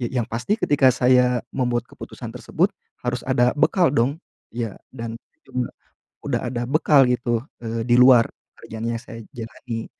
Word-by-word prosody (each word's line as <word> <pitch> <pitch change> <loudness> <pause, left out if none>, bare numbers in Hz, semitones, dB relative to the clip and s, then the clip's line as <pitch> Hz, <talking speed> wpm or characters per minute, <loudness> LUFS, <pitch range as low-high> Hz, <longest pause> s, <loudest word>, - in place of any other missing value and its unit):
ya 120 - -1
yang 110 - -3
pasti 120 - -1
ketika 140 -3 +4
saya 125 0 +3
membuat 120 -2 0
keputusan - - -9
tersebut - - 0 0.3
harus 125 0 -2
ada 125 -1 +3
bekal 175 +4 +3
dong, 140 +6 +1 0.3
ya 115 -3 -4 0.2
dan 115 -2 -6 1.1
udah - - -1
ada 120 -1 -3
bekal 145 -1 +5
gitu, 120 -2 0 0.2
eee, 115 0 -3
di 120 - +3
luar 125 -2 +7 0.3
kerjaan 110 0 -7
yang 115 - -1
saya 115 -2 -10
jalani, 115 0 -6
120 Hz, 150 wpm, -22 LUFS, 115-130 Hz, 1.1 s, luar